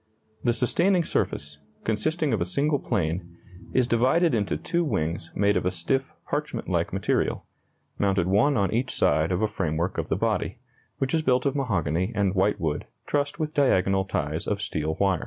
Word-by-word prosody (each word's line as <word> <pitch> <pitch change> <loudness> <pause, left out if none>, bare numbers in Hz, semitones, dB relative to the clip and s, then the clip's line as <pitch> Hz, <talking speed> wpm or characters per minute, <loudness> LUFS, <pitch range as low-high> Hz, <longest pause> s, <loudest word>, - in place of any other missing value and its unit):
The 120 - +3
sustaining 170 +10 +2
surface, 75 - -2 0.2
consisting 145 +8 0
of 105 - 0
a - - +2
single 140 +10 +1
plane, 85 -5 -2 0.3
is 130 - +3
divided 130 +8 +3
into 105 -4 0
two 170 0 -1
wings 85 - -2
made 100 +1 +3
of - - +1
a 90 - +2
stiff 95 +10 -1 0.2
parchment - - -3
like - - 0
material, - - 0 0.5
mounted 95 -3 +2
one 105 +10 +3
on 100 0 +1
each 125 +3 0
side 80 +4 +2
of 90 +4 0
a - - +3
framework 85 -3 -2
of - - -3
the - - +2
body, - - -1 0.4
which 135 0 -1
is 160 - +3
built 130 -3 +2
of 140 0 +1
mahogany 95 - 0
and 100 -2 +1
whitewood 90 -6 0 0.2
trussed 145 -1 -1
with 155 -1 -2
diagonal 95 -8 +3
ties 75 -4 -2
of 100 - 0
steel 80 -7 -2
wire. 95 -3 +2
100 Hz, 175 wpm, -26 LUFS, 85-135 Hz, 0.5 s, The